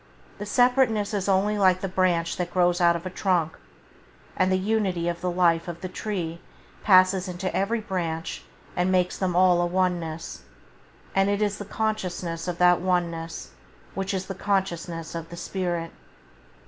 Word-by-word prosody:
The 205 - -5
separateness 245 -3 +2
is 200 -1 -1
only 205 +2 +2
like 185 -2 +4
the 195 - -1
branch 180 -3 +1
that 180 -1 -2
grows 175 0 +2
out 170 -1 +5
of 170 +2 -5
a - - -2
trunk, 180 -5 0 0.8
and 185 0 +2
the 185 - +3
unity 190 -4 0
of 170 0 -2
the 180 - -1
life 170 -2 +2
of 170 -1 -6
the 185 - -3
tree 180 -4 -4 0.4
passes 185 -1 +5
into 180 +1 -4
every 220 +4 0
branch 170 -5 -3 0.3
and 180 +1 +1
makes 180 -1 +2
them 185 -2 0
all 180 -1 +5
a - - +2
one 180 0 +1
ness; 165 0 -7 0.7
and 195 +1 +3
it 205 0 +1
is 205 -1 0
the 205 - -5
consciousness 185 -6 -3
of 175 -1 -3
that 180 0 +4
one 180 -2 +1
ness 165 0 -7 0.4
which 195 0 -3
is 190 0 -3
the 195 - -5
consciousness 175 -4 -2
of 165 -1 -6
the 170 - -9
spirit. 175 -3 -3
185 Hz, 175 wpm, -25 LUFS, 170-195 Hz, 0.8 s, out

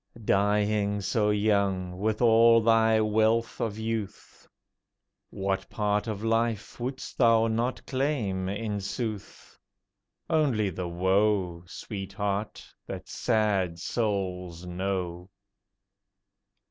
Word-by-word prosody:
Dying 105 +1 +2
so 105 +2 +1
young, 100 -4 +1
with 110 +3 0
all 115 0 +6
thy 110 0 +4
wealth 110 +2 +1
of 110 -2 -2
youth, 110 -2 -5 0.8
What 95 0 -2
part 105 0 0
of 110 -1 -4
life 115 -1 -1
wouldst 130 +2 -5
thou 115 -2 +5
not 115 +3 -1
claim, 120 -9 -1
in 105 0 -3
sooth? 105 +1 -6 0.7
Only 130 -11 +1
the 90 +1 -4
woe, 95 0 +1
Sweetheart, 100 +2 -4 0.2
that - - -7
sad 105 -7 0
souls 90 -4 -3
know. 90 -1 -3
105 Hz, 95 wpm, -27 LUFS, 95-115 Hz, 0.8 s, all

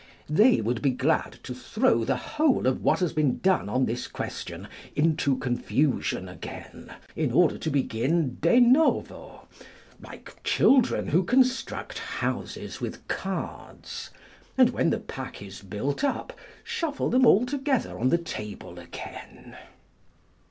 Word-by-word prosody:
They 220 +10 +5
would 115 +2 -1
be 140 - +3
glad 125 - 0
to - - -6
throw 115 0 +1
the 135 +3 +1
whole 290 - +1
of 130 0 +1
what - - +2
has 180 - 0
been 150 -5 +1
done 185 - +1
on 130 +4 +2
this 120 +2 -3
question - - -6 0.3
into 150 -2 +2
confusion 125 -4 0
again, 90 -2 -10 0.2
in - - 0
order - - +3
to - - -2
begin 135 +2 0
de 170 +10 +5
novo, 255 +6 +2 0.5
like - - -13
children 260 -3 +3
who 175 +5 +3
construct 255 +5 +1
houses - - -4
with - - -6
cards, - - -5 0.5
and 255 -1 +6
when - - +1
the 230 - +1
pack 135 -11 -8
is 100 -2 -10
built 105 - -3
up, 285 - -1 0.3
shuffle 340 -11 -2
them 255 +2 +4
all 230 -1 +6
together 270 0 -1
on 130 +3 +2
the 170 - +4
table 105 - -7
again. 85 -1 -10
155 Hz, 140 wpm, -26 LUFS, -, 0.5 s, and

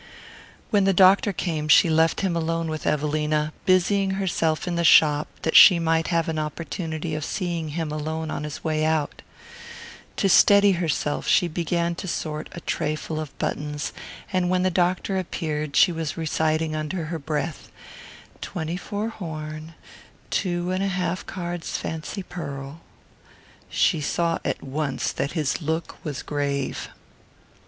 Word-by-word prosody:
When 200 -2 +3
the 195 -1 +3
doctor 195 +4 +6
came 160 -5 -2
she 155 - +7
left 160 0 +2
him 190 -3 0
alone 165 0 -1
with 155 -1 -4
Evelina, 150 +1 0
busying 190 +1 +3
herself 165 -4 0
in 175 - -1
the 170 0 0
shop 150 -2 +6 0.2
that 160 - 0
she 185 - +10
might 165 -1 +1
have 165 -2 +1
an 160 -1 -1
opportunity 160 +1 -4
of 155 0 -3
seeing 170 -3 -3
him 160 -3 -2
alone 155 +1 -3
on - - -3
his 150 -1 -6
way 155 -1 0
out. 155 -2 0 1.0
To - - +2
steady 200 +1 +6
herself 165 -4 -1
she 175 - +4
began 170 +1 -1
to 180 - -6
sort 155 -3 -4
a 170 - -8
trayful 155 +1 -2
of 155 -3 -7
buttons, 150 0 -3 0.4
and 180 -1 +1
when 185 0 +2
the 185 - +2
doctor 180 +2 +1
appeared 155 -5 -3
she 195 -2 +6
was 160 -3 -4
reciting 155 0 0
under 155 +2 -3
her 165 +1 -4
breath: 150 0 -4 0.7
"Twenty 170 0 -4
four 205 +3 -3
horn, 155 -5 -7 0.6
two 175 -1 -1
and 185 +1 -1
a - - +1
half 180 -1 -2
cards 175 -2 -4
fancy 160 +5 -5
pearl..." 140 -3 -7 0.9
She 160 -5 +2
saw 165 +3 0
at - - -2
once 140 0 -2
that 140 - -3
his 155 -1 -1
look 160 +2 -3
was 145 -5 -5
grave. 140 -2 -2
160 Hz, 150 wpm, -24 LUFS, 155-180 Hz, 1.0 s, she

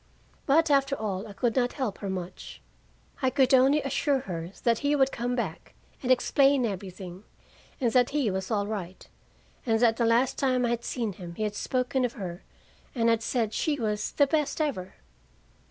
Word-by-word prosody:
But 315 +2 +4
after 275 0 +3
all, 205 -2 -3
I 205 - -9
could 235 +3 0
not 245 -2 +1
help 255 -8 -3
her 200 - -4
much. 185 -2 -6 0.6
I 260 - +3
could 265 0 +2
only 270 +3 +5
assure 275 0 0
her 170 -7 -5
that 230 -2 +2
he 290 0 +1
would 270 -1 +3
come 245 +1 -2
back 200 -10 -5 0.3
and 255 - 0
explain 275 +1 +4
everything, 190 -2 -6 0.6
and 245 -4 +1
that 245 -1 +4
he 280 -7 0
was 190 0 -3
all 205 -3 0
right, 190 -4 -6 0.6
and 225 -3 +1
that 230 -1 +3
the 235 - +2
last 240 +3 +2
time 255 -2 +2
I - - 0
had 235 0 -1
seen 230 -5 -2
him 175 -2 -9
he 215 - -3
had 210 -1 -1
spoken 255 +4 -1
of 245 -1 -1
her, 180 -4 -6 0.5
and 230 -2 +2
had 230 -1 +2
said 225 -2 -1
she 295 -2 0
was 210 -2 -2
"the 285 - +4
best 300 +1 0
ever." 260 -13 -2
235 Hz, 190 wpm, -27 LUFS, 205-270 Hz, 0.6 s, only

